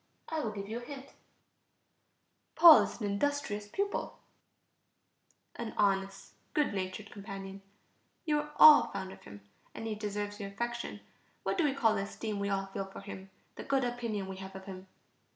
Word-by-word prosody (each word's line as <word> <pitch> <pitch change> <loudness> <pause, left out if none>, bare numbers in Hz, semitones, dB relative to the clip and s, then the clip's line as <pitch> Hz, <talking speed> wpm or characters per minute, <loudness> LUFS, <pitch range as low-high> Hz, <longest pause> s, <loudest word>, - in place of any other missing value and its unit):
I 320 - -1
will 235 - -1
give 200 -2 -6
you 225 +3 -4
a - - -11
hint: 275 +1 -9 1.4
Paul 335 -3 +10
is - - -4
an 215 - -2
industrious 210 -1 -1
pupil, 400 - -3 1.4
an 235 -2 -6
honest, 195 -1 0 0.2
good 295 -8 +2
natured 190 +2 -4
companion; 195 -1 -8 0.6
you 300 -2 +2
are 300 0 -5
all 305 -1 +9
fond 190 0 -6
of - - -15
him, 100 0 -11 0.3
and - - -6
he 220 - -2
deserves 205 0 -4
your 200 -1 -5
affection. 235 +4 -4 0.4
What 390 - -1
do - - +4
we 275 -2 +1
call 230 -5 +3
the - - -1
esteem 205 +1 -4
we 200 0 -1
all 195 -1 0
feel 195 0 -5
for 195 - -10
him, 195 -1 -9 0.3
the - - -6
good 275 -1 +1
opinion 235 -5 -2
we 190 0 -7
have 190 0 -9
of 190 0 -9
him? 190 -1 -9
205 Hz, 175 wpm, -32 LUFS, 195-245 Hz, 1.4 s, Paul